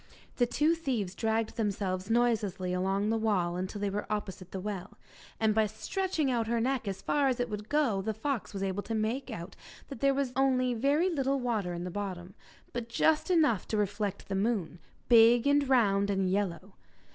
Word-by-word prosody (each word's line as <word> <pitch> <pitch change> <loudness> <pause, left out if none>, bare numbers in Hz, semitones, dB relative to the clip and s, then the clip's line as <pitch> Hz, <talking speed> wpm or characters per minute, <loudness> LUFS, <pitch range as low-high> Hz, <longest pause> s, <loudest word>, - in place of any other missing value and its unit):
The 245 - +3
two 300 +6 +2
thieves 250 - -2
dragged 220 +1 -1
themselves 195 -3 -2
noiselessly 210 -6 +1
along 195 +3 0
the 225 - +1
wall 180 -5 0
till 205 - -7
they 200 -1 -1
were 210 +2 -4
opposite 195 -3 -4
the 190 - -5
well, 190 -2 -6 0.4
and 220 -1 +3
by 220 0 +3
stretching 290 - -1
out 230 -2 0
her 235 0 +1
neck 255 -1 -1
as 195 -1 -4
far 285 -2 +2
as 255 -2 0
it 245 -2 -1
would 210 0 -5
go 275 -10 +2
the 215 +2 -3
fox 265 +1 -3
was 195 -1 -4
able 195 +1 -1
to 225 +2 -4
make 230 +6 -1
out 185 -4 -7 0.3
that 275 - -7
there 275 +1 +3
was 270 -2 -1
only 255 -2 +2
very 285 +10 +2
little 275 -3 0
water 220 -7 -1
in 170 - -5
the 180 - -5
bottom, 190 -2 -5 0.4
but 235 -1 -4
just 310 +8 +2
enough 305 - +3
to 215 - -1
reflect 205 -1 -2
the 195 - -4
moon, 195 -4 -1 0.3
big, 235 +1 +6
and 285 -1 +3
round 200 -6 +3
and 190 -2 +1
yellow. 195 -1 -2
220 Hz, 195 wpm, -30 LUFS, 195-255 Hz, 0.4 s, big